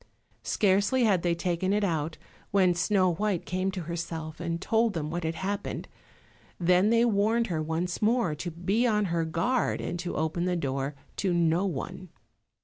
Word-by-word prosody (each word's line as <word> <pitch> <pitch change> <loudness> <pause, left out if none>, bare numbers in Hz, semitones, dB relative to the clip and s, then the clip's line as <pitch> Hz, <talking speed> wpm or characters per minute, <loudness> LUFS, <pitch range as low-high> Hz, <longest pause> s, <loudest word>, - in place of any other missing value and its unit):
Scarcely 205 +5 +2
had 200 -6 +3
they 170 -1 +1
taken 180 +2 0
it 210 0 +1
out 160 -4 -1 0.3
when 185 -3 +4
Snow 185 0 +2
white 200 0 -1
came 185 +1 -1
to 190 -1 -4
herself, 165 -1 -5
and 170 -1 -2
told 225 +3 +2
them 155 -2 -3
what 175 +1 -3
had 160 0 -2
happened. 195 +4 -3 0.7
Then 180 +3 +4
they 230 +1 +4
warned 225 +1 +2
her 155 - 0
once 165 +3 -2
more 225 -6 +2
to 155 +4 -4
be 190 +9 0
upon 210 -2 +2
her 170 -2 0
guard 180 +11 0
and 175 - -4
to 175 0 -4
open 160 +3 -1
the 180 0 +1
door 140 -2 -2 0.2
to 185 -3 +1
no 170 +3 +2
one. 180 +3 -5
180 Hz, 175 wpm, -28 LUFS, 165-200 Hz, 0.7 s, when